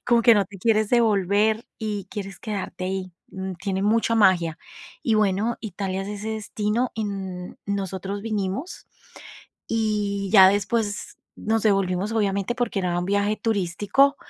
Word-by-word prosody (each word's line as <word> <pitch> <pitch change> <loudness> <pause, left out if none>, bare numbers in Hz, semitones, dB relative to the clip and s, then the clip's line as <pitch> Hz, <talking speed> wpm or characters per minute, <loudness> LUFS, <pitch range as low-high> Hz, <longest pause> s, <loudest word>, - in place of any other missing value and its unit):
como 235 -1 +4
que 235 0 +7
no 200 -1 +3
te 205 - -12
quieres 215 +1 +2
devolver 215 -1 +2
y 210 -3 -3
quieres 195 -4 -6
quedarte 200 -3 -4
ahí, 185 -1 -3 0.2
mm, 190 -1 -5
tiene 190 +1 -3
mucha 225 +2 +2
magia, 180 -7 +3 0.5
y 225 - +2
bueno, 215 +2 +1
Italia 195 -2 -3
es 195 - -6
ese 210 +1 -5
destino, 220 +2 -1
y, 220 - -4
n 190 -3 -5
nosotros 195 0 -3
vinimos 210 - -3 0.8
y 205 -3 0
ya 190 -3 +9
después 205 +1 -1 0.2
nos 225 0 0
devolvimos, 195 0 +1
obviamente, 200 0 0
porque 245 -4 -1
era 175 -1 -1
un 175 - -1
viaje 205 +1 +1
turístico, 215 +7 +2
205 Hz, 145 wpm, -24 LUFS, 190-220 Hz, 0.8 s, ya